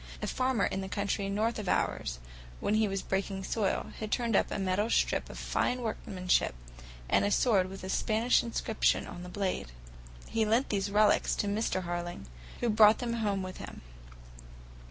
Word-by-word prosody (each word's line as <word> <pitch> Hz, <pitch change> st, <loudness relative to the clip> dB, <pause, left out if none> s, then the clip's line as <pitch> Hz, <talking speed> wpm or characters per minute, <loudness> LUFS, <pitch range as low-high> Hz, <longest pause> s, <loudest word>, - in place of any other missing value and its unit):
A -, -, -3 dB
farmer 255 Hz, -4 st, +1 dB
in 195 Hz, -, -2 dB
the 190 Hz, -, -5 dB
county 200 Hz, 0 st, -1 dB
north 220 Hz, +3 st, 0 dB
of 200 Hz, -4 st, -3 dB
ours, -, -, 0 dB, 0.4 s
when 205 Hz, -, 0 dB
he 215 Hz, 0 st, +3 dB
was 195 Hz, -1 st, -3 dB
breaking 190 Hz, 0 st, -2 dB
sod, 200 Hz, 0 st, -1 dB
had 215 Hz, -1 st, -5 dB
turned 235 Hz, -3 st, +1 dB
up -, -, +3 dB
a -, -, -3 dB
metal 195 Hz, +3 st, 0 dB
stirrup -, -, +1 dB
of -, -, -9 dB
fine 250 Hz, 0 st, -1 dB
workmanship, 185 Hz, -, 0 dB, 0.5 s
and -, -, +3 dB
a 205 Hz, -, +2 dB
sword 200 Hz, -4 st, +3 dB
with 195 Hz, 0 st, -9 dB
a 185 Hz, -, -5 dB
Spanish 220 Hz, +5 st, +2 dB
inscription 230 Hz, -1 st, 0 dB
on 175 Hz, -, -8 dB
the 180 Hz, -, -8 dB
blade. 185 Hz, -, -2 dB, 0.6 s
He 225 Hz, -, 0 dB
lent 225 Hz, +5 st, +2 dB
these 200 Hz, -1 st, 0 dB
relics 210 Hz, +1 st, +3 dB
to 205 Hz, -, -1 dB
Mr. 200 Hz, -2 st, 0 dB
Harling, 175 Hz, -, -4 dB, 0.4 s
who 240 Hz, -, +1 dB
brought 215 Hz, 0 st, +7 dB
them 240 Hz, -1 st, -2 dB
home 200 Hz, -3 st, 0 dB
with 185 Hz, 0 st, -7 dB
him. -, -, -9 dB
205 Hz, 180 wpm, -30 LUFS, 190-220 Hz, 0.6 s, brought